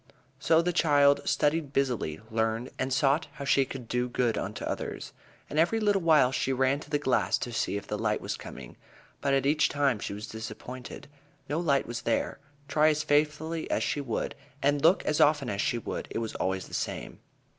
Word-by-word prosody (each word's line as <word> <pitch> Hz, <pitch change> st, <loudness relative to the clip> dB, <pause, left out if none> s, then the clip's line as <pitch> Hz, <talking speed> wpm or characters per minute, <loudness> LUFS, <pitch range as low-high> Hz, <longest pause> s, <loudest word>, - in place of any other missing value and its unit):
So 165 Hz, 0 st, +4 dB
the 180 Hz, +1 st, 0 dB
child 145 Hz, -4 st, +4 dB
studied 150 Hz, -1 st, +1 dB
busily, 125 Hz, -, -1 dB
learned, 115 Hz, +2 st, -1 dB
and 130 Hz, -, -1 dB
sought 140 Hz, +3 st, +2 dB
how 140 Hz, -, -7 dB
she 135 Hz, 0 st, +3 dB
could 125 Hz, -3 st, -8 dB
do 125 Hz, +1 st, -1 dB
good 120 Hz, -2 st, +1 dB
unto 105 Hz, +2 st, -4 dB
others. -, -, -4 dB, 0.3 s
And 150 Hz, -, -2 dB
every 180 Hz, +8 st, +3 dB
little 205 Hz, -2 st, +2 dB
while 155 Hz, -6 st, +5 dB
she 135 Hz, 0 st, 0 dB
ran 135 Hz, +2 st, +2 dB
to 150 Hz, -, -12 dB
the 150 Hz, -, +2 dB
glass 135 Hz, -3 st, +1 dB
to 120 Hz, -, -5 dB
see 105 Hz, -, -1 dB
if 100 Hz, -, -7 dB
the -, -, -4 dB
light -, -, 0 dB
was -, -, -4 dB
coming. 65 Hz, -3 st, -10 dB, 0.4 s
But 140 Hz, -1 st, +2 dB
at 135 Hz, -, +1 dB
each 150 Hz, +2 st, +3 dB
time 140 Hz, -6 st, +1 dB
she -, -, -4 dB
was 105 Hz, +2 st, -6 dB
disappointed. 115 Hz, +3 st, -8 dB, 0.4 s
No 150 Hz, +4 st, -1 dB
light 145 Hz, -5 st, +2 dB
was 120 Hz, 0 st, -5 dB
there. 115 Hz, -, -1 dB, 0.3 s
Try 150 Hz, +2 st, +3 dB
as 150 Hz, 0 st, 0 dB
faithfully 150 Hz, +2 st, 0 dB
as -, -, +1 dB
she 145 Hz, -, -1 dB
would, 125 Hz, -5 st, -3 dB, 0.3 s
and 145 Hz, +1 st, +2 dB
look 165 Hz, +5 st, +4 dB
as 150 Hz, -, +1 dB
often 145 Hz, -5 st, +3 dB
as 100 Hz, 0 st, -1 dB
she 120 Hz, -, 0 dB
would, 115 Hz, -, -5 dB
it -, -, -4 dB
was 115 Hz, -1 st, -3 dB
always 95 Hz, 0 st, -2 dB
the -, -, -15 dB
same. -, -, -4 dB
140 Hz, 205 wpm, -28 LUFS, 120-150 Hz, 0.4 s, while